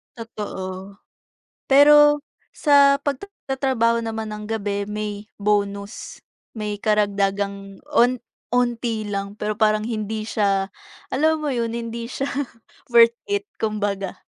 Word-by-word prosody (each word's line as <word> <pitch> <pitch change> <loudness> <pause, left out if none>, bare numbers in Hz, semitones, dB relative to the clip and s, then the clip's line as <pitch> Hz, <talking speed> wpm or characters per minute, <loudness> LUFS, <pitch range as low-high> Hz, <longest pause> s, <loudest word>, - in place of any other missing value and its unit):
Totoo. 195 -4 -7 0.7
Pero 295 +1 +7 0.3
sa 280 -2 +5
pagtatrabaho 265 - -1
naman 220 -1 -4
ng 210 0 -6
gabi, 205 -2 -2
may 210 0 -3 0.3
bonus, 200 0 -2 0.3
may 210 -1 -3
karagdagang 200 -2 0
on 255 -2 +4 0.3
onti 240 -3 0
lang, 200 0 -4
pero 210 0 -2
parang 215 0 +2
hindi 215 -1 -3
siya 195 -3 +1 0.4
alam 315 +4 +1
mo 305 - -3
'yon, 235 -4 -1
hindi 230 0 -4
siya 275 - -2 0.6
worth 235 -1 +7 0.2
it, 405 0 0 0.2
kumbaga. 205 -3 -2
220 Hz, 110 wpm, -22 LUFS, 205-245 Hz, 0.7 s, Pero